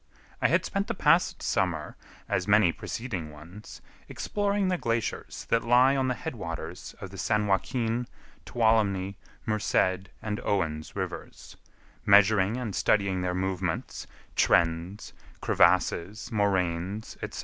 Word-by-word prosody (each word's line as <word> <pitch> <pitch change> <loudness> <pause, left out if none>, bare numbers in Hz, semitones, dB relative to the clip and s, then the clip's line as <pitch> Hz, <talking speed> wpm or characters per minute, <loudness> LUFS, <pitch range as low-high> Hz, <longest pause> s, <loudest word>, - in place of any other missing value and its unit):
I - - +5
had - - +2
spent - - -2
the - - -2
past - - +3
summer, - - -1 0.3
as 90 - -1
many 105 -4 +5
preceding 90 -3 -5
ones, 85 +8 -12 0.3
exploring 205 -1 -1
the 185 -1 +1
glaciers 115 -1 -3
that 115 - +3
lie 125 +3 +5
on 135 -1 +1
the 125 - 0
head 160 - -5
waters 85 -2 -6
of 95 - -8
the 95 - -9
San 105 +2 +1
Joaquin, 115 +4 0 0.4
Tuolumne, 105 -5 +1 0.3
Merced, 95 -3 0
and 105 -1 -3
Owen's 80 -6 -2
rivers; - - -6 0.5
measuring 100 +1 +5
and 115 -7 -4
studying 100 -2 +1
their 90 0 -1
movements, 95 -2 -3 0.3
trends, 85 +4 +1 0.3
crevasses, 95 +5 +2
moraines, 95 -1 -1
etc. - - -5
100 Hz, 125 wpm, -28 LUFS, 90-115 Hz, 0.5 s, I